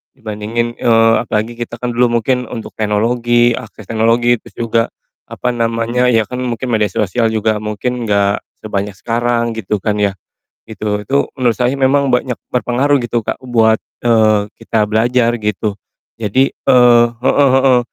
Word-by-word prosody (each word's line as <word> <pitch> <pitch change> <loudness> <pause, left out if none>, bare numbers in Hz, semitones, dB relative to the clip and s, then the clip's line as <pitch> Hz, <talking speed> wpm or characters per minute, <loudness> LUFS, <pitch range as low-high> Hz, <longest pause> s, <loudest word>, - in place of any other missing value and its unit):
dibandingin 115 +2 -4
eee, 115 -1 +4
apalagi 115 +1 -3
kita 120 0 -5
kan 120 +1 -4
dulu 120 +1 +2
mungkin 125 +1 -1
untuk 115 -1 -7
teknologi, 120 +3 +2
akses 110 -2 -7
teknologi, 115 +2 +2
terus - - -17
juga, 115 -1 +1 0.4
apa 125 - -2
namanya 115 +1 0
ya, 115 -3 +3
kan 125 +4 -6
mungkin 125 0 -3
media 110 -2 +2
sosial 110 +4 0
juga 110 -1 0
mungkin 115 +3 -3
gak 100 -1 +1 0.2
sebanyak 100 -1 -3
sekarang 120 +1 -1
gitu 105 0 -2
kan 105 -1 0
ya, 100 -1 +1 0.5
gitu. 105 -1 -3
Itu 135 +7 -1
menurut 125 -4 0
saya 125 +1 +1
memang 135 -1 +2
banyak 125 -1 0 0.2
berpengaruh 130 +3 +1
gitu, 120 -2 -2
Kak, - - -4
buat, 115 -3 +2 0.2
eee, 110 -3 +3
kita 115 -2 -1
belajar 120 +2 +2
gitu. 105 0 -1 0.4
Jadi 115 +5 0
eee, 120 -1 +5
heeh 125 +4 +2
heeh, 130 -2 +4
115 Hz, 155 wpm, -16 LUFS, 110-125 Hz, 0.5 s, eee